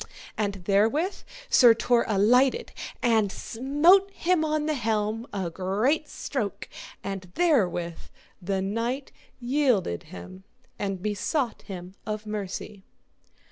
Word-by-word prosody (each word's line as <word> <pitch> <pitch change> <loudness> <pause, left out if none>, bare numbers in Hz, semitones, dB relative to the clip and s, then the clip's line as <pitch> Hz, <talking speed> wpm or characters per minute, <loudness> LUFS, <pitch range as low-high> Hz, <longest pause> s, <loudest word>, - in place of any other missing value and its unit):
And 200 -3 -2
therewith 225 - +2 0.3
Sir 240 - +7
Tor 235 +1 +2
alighted 250 - +3 0.3
and 220 -4 +3
smote 295 - +3
him 360 -3 +1
on 305 -1 0
the 310 - +1
helm 220 -2 -1
a 185 -4 -3
great 215 - 0
stroke, 220 -8 -4 0.4
and 195 -2 -5
therewith 185 - +1 0.4
the 190 +1 -1
knight 230 +7 -2 0.3
yielded 245 - +1
him 90 - -10 0.4
and 195 -2 -3
besought 225 +5 -1
him 185 -2 -8
of 215 -1 -4
mercy. 205 -1 -5
220 Hz, 110 wpm, -26 LUFS, 195-275 Hz, 0.4 s, Sir